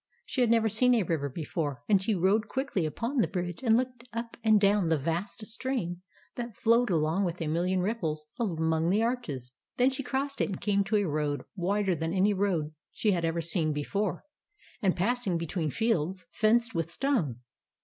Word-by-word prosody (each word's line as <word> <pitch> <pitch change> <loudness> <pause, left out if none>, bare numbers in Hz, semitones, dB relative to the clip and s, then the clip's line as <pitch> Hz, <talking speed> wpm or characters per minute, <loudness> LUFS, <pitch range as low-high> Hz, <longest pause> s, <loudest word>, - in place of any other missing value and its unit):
She 260 - -1
had 240 - +4
never 225 -1 +4
seen 245 +4 +4
a 225 - +2
river 155 -5 -1
before; 145 -1 -3
and 200 -3 +4
she 210 +2 0
rode 195 +5 +2
quickly 265 - -1
upon 230 - -3
the 235 - +4
bridge, 175 -2 -4
and 230 -3 +4
looked 250 -1 -2
up 230 0 -5
and 220 -2 +5
down 200 -2 +3
the 160 -1 +3
vast 170 +9 -3
stream 220 -7 -3 0.3
that 235 -3 -6
flowed 235 +1 +3
along 165 +2 +1
with 175 -2 -2
a 165 - -2
million 175 +4 +1
ripples 165 -7 -2
among 160 -6 +1
the 210 +4 +3
arches. 155 - -3 0.3
Then 250 +2 +4
she 265 +1 -3
crossed 275 +1 -2
it - - +1
and 190 - -4
came 200 -1 +2
to 215 +2 0
a 205 -2 +2
road, 150 -1 -1
wider 195 +1 +1
than 165 0 -2
any 195 +2 +3
road 185 -6 0
that - - -23 0.2
she 215 - +1
had 175 -3 0
ever 165 +1 0
seen 165 -2 +1
be 145 0 -2
fore, 195 +1 -2 0.6
and 190 -3 +2
passing 205 -1 0
between 165 -1 -2
fields 190 - 0
fenced 230 +2 +2
with 165 -1 -1
stone. 170 - -1
195 Hz, 200 wpm, -29 LUFS, 165-230 Hz, 0.6 s, and